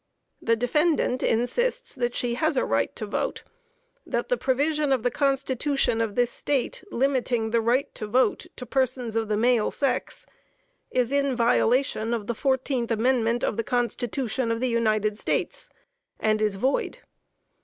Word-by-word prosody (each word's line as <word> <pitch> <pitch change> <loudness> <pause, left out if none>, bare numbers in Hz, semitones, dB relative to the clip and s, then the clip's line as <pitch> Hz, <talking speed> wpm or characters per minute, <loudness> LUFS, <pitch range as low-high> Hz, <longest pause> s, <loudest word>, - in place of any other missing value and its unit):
The 230 - +2
defendant 255 +2 +1
insists 480 - 0
that 245 -3 -2
she 240 -1 0
has 310 +3 0
a - - +2
right 115 +1 0
to 215 - -4
vote; 205 - -3 0.6
that - - -3
the - - +3
provision 295 - 0
of 260 -4 +2
the 245 - +1
Constitution 275 -3 0
of 220 -3 -2
this 245 -1 +2
State 280 +4 -2
limiting 245 -3 0
the 230 0 +2
right 250 +5 +1
to 215 - -6
vote 250 +5 +1
to 250 - -7
persons 250 -2 -1
of 225 -1 0
the 210 0 0
male 235 -1 +3
sex 275 -3 -2 0.6
is 250 -1 0
in 280 -2 +1
violation 235 0 +2
of 215 -3 -5
the 235 - -2
14th 260 -1 0
Amendment 235 0 +1
of - - 0
the 230 - 0
Constitution 245 0 -1
of 230 - -1
the 255 +1 0
United 215 -2 +1
States, - - -2 0.5
and 215 0 +1
is 210 -2 +1
void. 260 - 0
245 Hz, 160 wpm, -25 LUFS, 225-270 Hz, 0.6 s, the